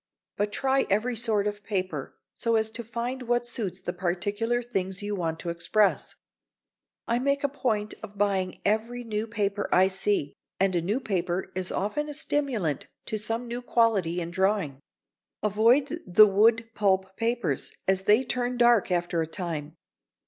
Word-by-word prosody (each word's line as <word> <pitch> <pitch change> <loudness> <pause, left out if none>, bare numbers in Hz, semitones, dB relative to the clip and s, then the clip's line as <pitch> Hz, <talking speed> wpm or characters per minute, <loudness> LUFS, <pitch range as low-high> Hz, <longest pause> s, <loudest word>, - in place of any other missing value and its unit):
But 205 0 -1
try 270 +4 +1
every 230 +5 +1
sort 220 -3 +2
of 205 0 -3
paper 185 -9 -3 0.2
so 230 -1 0
as 220 0 +2
to 235 - -5
find 240 +3 -4
what 240 0 0
suits 225 -6 -4
the 175 - -3
particular 205 +7 -1
things 190 -4 -3
you 205 0 -2
want 165 -3 -2
to 175 - -4
express. 195 +5 +1 0.9
I 235 +1 +1
make 280 +2 0
a - - +4
point 225 -7 -1
of 210 -2 -10
buying 195 -2 0
every 225 +4 0
new 220 -1 -3
paper 205 -2 -1
I 185 +1 +5
see, 190 -6 0 0.3
and 190 -1 +2
a 170 - +2
new 205 +9 0
paper 185 -6 -2
is 185 0 -2
often 295 +10 -2
a 295 - -6
stimulant 265 - 0 0.2
to 215 - -3
some 225 +3 -2
new 240 +1 -4
quality 215 -8 +2
in 170 -1 -4
drawing. 190 -6 0 0.6
Avoid 240 - +3
the 190 +4 +8
wood 225 +3 +3
pulp 190 -2 +1
papers, 230 - -1 0.2
as 190 0 +2
they 215 +6 +5
turn 250 0 -2
dark 240 -3 +4
after 175 -1 0
a 160 - -2
time. 160 -3 -5
210 Hz, 165 wpm, -27 LUFS, 185-235 Hz, 0.9 s, the